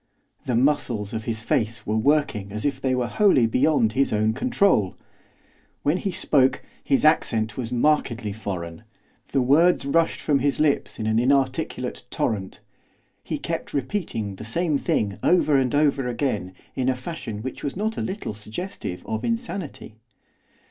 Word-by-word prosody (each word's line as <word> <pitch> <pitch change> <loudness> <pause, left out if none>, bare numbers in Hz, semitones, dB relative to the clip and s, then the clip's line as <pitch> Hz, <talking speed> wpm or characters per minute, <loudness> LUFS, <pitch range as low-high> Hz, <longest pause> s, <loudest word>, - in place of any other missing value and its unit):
The 125 - +1
muscles 120 -5 +1
of 110 0 -4
his 110 -2 -2
face 110 0 -1
were 105 - -1
working 110 -5 +1
as 105 +4 -4
if 135 -2 -1
they 130 -1 +1
were 125 -1 0
wholly 135 - +4
beyond 115 -1 +2
his 135 +2 +2
own 110 +1 +2
control. 195 - +2 0.9
When 150 +5 +2
he 195 +1 -2
spoke 135 -6 +2 0.2
his 135 - +3
accent 110 -8 +2
was 120 -2 -4
markedly 120 -5 +1
foreign; 90 -6 -6 0.4
the 135 - +1
words 155 +5 +4
rushed 165 +4 +2
from 145 -3 +1
his 140 +1 0
lips 150 -2 +1
in 110 - -3
an 110 +1 +2
inarticulate 130 0 0
torrent; 100 -4 -2 0.6
he - - -3
kept - - -4
repeating 125 - -2
the - - -8
same 155 +8 0
thing 100 -6 -1
over 160 -4 +3
and 130 -1 +2
over 140 -3 +2
again 105 -8 -2 0.2
in 130 -1 0
a 130 - +1
fashion 125 -6 -6
which 130 - -6
was 140 - -3
not 215 +3 -1
a - - -3
little 190 - -4
suggestive 110 - -6
of 110 +1 -3
insanity. 200 - -4
130 Hz, 160 wpm, -24 LUFS, 110-150 Hz, 0.9 s, wholly